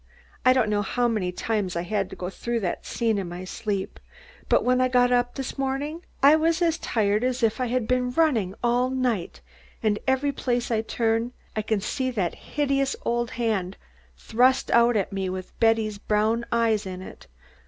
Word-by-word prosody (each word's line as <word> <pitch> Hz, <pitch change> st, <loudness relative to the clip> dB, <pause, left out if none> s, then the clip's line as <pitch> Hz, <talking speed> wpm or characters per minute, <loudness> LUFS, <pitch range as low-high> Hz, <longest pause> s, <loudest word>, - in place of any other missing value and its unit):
I 255 Hz, -, +6 dB
don't 255 Hz, -4 st, +3 dB
know 205 Hz, -1 st, +2 dB
how 245 Hz, +4 st, 0 dB
many 210 Hz, -6 st, -1 dB
times 200 Hz, -1 st, -2 dB
I 170 Hz, -, -1 dB
had 195 Hz, +1 st, -1 dB
to -, -, -8 dB
go 180 Hz, +1 st, -5 dB
through 235 Hz, +3 st, -3 dB
that 180 Hz, -, -3 dB
scene 225 Hz, -3 st, 0 dB
in 185 Hz, -3 st, -4 dB
my 175 Hz, +1 st, -6 dB
sleep, 195 Hz, +1 st, -4 dB, 0.5 s
but -, -, +4 dB
when 250 Hz, +1 st, +3 dB
I 255 Hz, -, +4 dB
got 250 Hz, -1 st, +3 dB
up 245 Hz, 0 st, +1 dB
this 270 Hz, +1 st, -5 dB
morning 280 Hz, +5 st, -2 dB, 0.2 s
I 285 Hz, +2 st, +8 dB
was 325 Hz, +2 st, +2 dB
as 335 Hz, -1 st, +1 dB
tired 210 Hz, 0 st, +1 dB
as 255 Hz, 0 st, -1 dB
if 225 Hz, +3 st, +1 dB
I 250 Hz, -, +1 dB
had 240 Hz, -1 st, -1 dB
been 250 Hz, 0 st, +1 dB
running 250 Hz, -, +1 dB
all 245 Hz, +1 st, +2 dB
night, 250 Hz, -8 st, -2 dB, 0.4 s
and 210 Hz, -1 st, +1 dB
every 265 Hz, +2 st, +2 dB
place 245 Hz, -3 st, -1 dB
I 220 Hz, -1 st, +2 dB
turn 225 Hz, +1 st, -1 dB, 0.2 s
I 215 Hz, -, 0 dB
can 215 Hz, -1 st, -1 dB
see 260 Hz, +5 st, -2 dB
that 200 Hz, -9 st, -1 dB
hideous 275 Hz, -2 st, -1 dB
old 240 Hz, 0 st, 0 dB
hand 210 Hz, -6 st, -2 dB, 0.4 s
thrust 250 Hz, -, +2 dB
out 235 Hz, -1 st, +5 dB
at 200 Hz, 0 st, -2 dB
me 190 Hz, -1 st, -2 dB
with 185 Hz, 0 st, -6 dB
Betty's 225 Hz, -2 st, +2 dB
brown 215 Hz, +3 st, +1 dB
eyes 225 Hz, -3 st, +1 dB
in 185 Hz, 0 st, -6 dB
it. -, -, -12 dB
235 Hz, 195 wpm, -25 LUFS, 210-255 Hz, 0.5 s, I